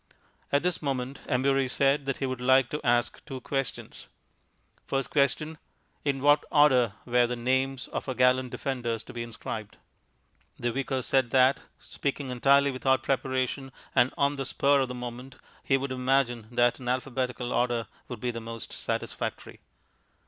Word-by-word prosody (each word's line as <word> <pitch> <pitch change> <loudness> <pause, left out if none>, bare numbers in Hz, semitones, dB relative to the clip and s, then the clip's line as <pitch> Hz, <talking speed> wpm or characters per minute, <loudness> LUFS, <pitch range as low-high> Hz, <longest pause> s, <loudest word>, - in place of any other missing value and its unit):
At 140 +2 +2
this 180 -2 0
moment 135 -2 -3
Embury 135 +1 +2
said 140 +2 +2
that 135 - -1
he 135 - -2
would 130 -1 -3
like 130 0 +4
to 150 - -3
ask 120 0 +1
two 135 -3 -7
questions. 135 0 -4 0.8
First 135 0 -1
question 150 +2 +1 0.4
In 140 -2 -1
what 145 +1 +5
order 130 -8 +5
were 120 0 +3
the 125 - -2
names 130 +1 0
of - - -4
our 130 - -2
gallant 125 0 +3
defenders 120 -4 -3
to - - -11
be 120 - -4
inscribed? 115 -2 -6 0.8
The 120 0 -1
Vicar 135 +1 -2
said 130 -1 +2
that, 130 +2 +4 0.2
speaking 140 -1 -4
entirely 140 +3 +4
without 130 0 +1
preparation 135 0 -1 0.2
and 125 - +4
on 140 0 +2
the 135 - -3
spur 140 +2 +3
of 130 - 0
the 125 - -6
moment, 125 +2 -7 0.3
he 135 - +3
would 135 0 -4
imagine 125 -3 +1
that 120 +1 +2
an 125 -1 -4
alphabetical 125 -1 -2
order 120 -2 +1 0.2
would 125 -3 -7
be 125 +2 -1
the 115 -1 -6
most 115 0 -7
satisfactory. - - -4
130 Hz, 165 wpm, -28 LUFS, 125-135 Hz, 0.8 s, what